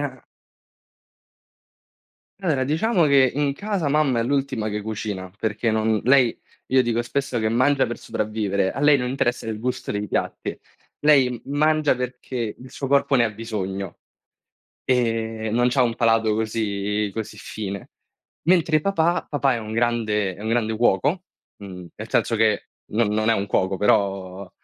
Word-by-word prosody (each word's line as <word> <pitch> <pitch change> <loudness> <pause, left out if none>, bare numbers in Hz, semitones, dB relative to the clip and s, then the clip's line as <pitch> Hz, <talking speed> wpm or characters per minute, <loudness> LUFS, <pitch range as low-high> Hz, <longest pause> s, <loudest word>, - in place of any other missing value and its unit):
ha 130 -3 -5 2.2
Allora, 155 -9 +1
diciamo 170 - +2
che 140 -3 +5
in 145 0 0
casa 200 -3 -2
mamma 140 -4 +2
è - - +2
l'ultima 135 -4 -1
che 105 0 -3
cucina, 105 -3 -5
perché 110 +2 -1
non 110 0 +1
lei 130 -2 +4 0.3
io 130 0 +4
dico 120 -1 0
spesso 130 +1 -2
che 110 -1 +1
mangia 130 +4 +3
per 120 - -5
sopravvivere, 105 -3 -1
a 135 - -5
lei 145 0 +6
non 125 -2 -2
interessa 120 -3 -1
il 110 -1 -3
gusto 125 +2 -3
dei 105 0 -3
piatti, - - -3 0.4
lei 145 -4 +5
m 120 -2 -6 0.2
mangia 155 -1 +3
perché 125 -2 -4
il 130 0 -12
suo 135 - -5
corpo 140 0 +3
ne 125 -3 +5
ha 115 - 0
bisogno 100 -4 -5 0.9
e 115 -3 0
non 120 +2 +3
c'ha 130 +1 +2
un 115 -2 0
palato 115 -2 +2
così 105 -2 -1
così 110 -2 -5
fine. 100 -2 -6 0.6
Mentre 165 -4 +4
papà, 175 -2 +1
papà 140 -2 +1
è 115 - -3
un 110 0 -7
grande 110 -4 0
è - - -12
un 110 - -3
grande 110 -1 0
cuoco, 130 - +2 0.3
mhmm, 90 -3 -9
nel - - -8
senso 115 - +1
che 110 -1 +1 0.2
non 115 +1 +2
non 110 +1 +1
è - - +5
un 100 -2 -1
cuoco, 95 -1 0
però 95 -2 0
115 Hz, 165 wpm, -23 LUFS, 105-135 Hz, 2.2 s, lei